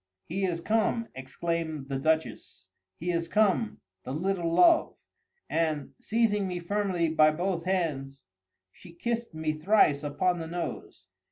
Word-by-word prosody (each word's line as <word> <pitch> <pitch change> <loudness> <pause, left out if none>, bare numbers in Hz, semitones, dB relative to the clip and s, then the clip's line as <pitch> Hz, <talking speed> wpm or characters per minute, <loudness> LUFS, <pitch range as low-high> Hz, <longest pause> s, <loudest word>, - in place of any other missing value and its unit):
"He 190 +3 -2
is 170 -2 -2
come!" 225 +3 0
exclaimed 155 +2 -3
the 135 -1 -2
Duchess. 160 +3 -1 0.3
"He 175 +2 -2
is 170 -1 -1
come, 170 - +1 0.2
the 130 - -5
little 175 +1 -1
love!"—and, 165 - +1
seizing 215 -3 +1
me 180 -1 -3
firmly 180 -2 0
by 155 -1 +5
both 175 +2 -2
hands, 140 -8 -2 0.5
she 170 - -15
kissed 235 +2 -3
me 155 -1 -1
thrice 155 -3 +3
upon 170 +5 0
the 165 - -5
nose. 170 - -6
170 Hz, 135 wpm, -28 LUFS, 155-195 Hz, 0.5 s, by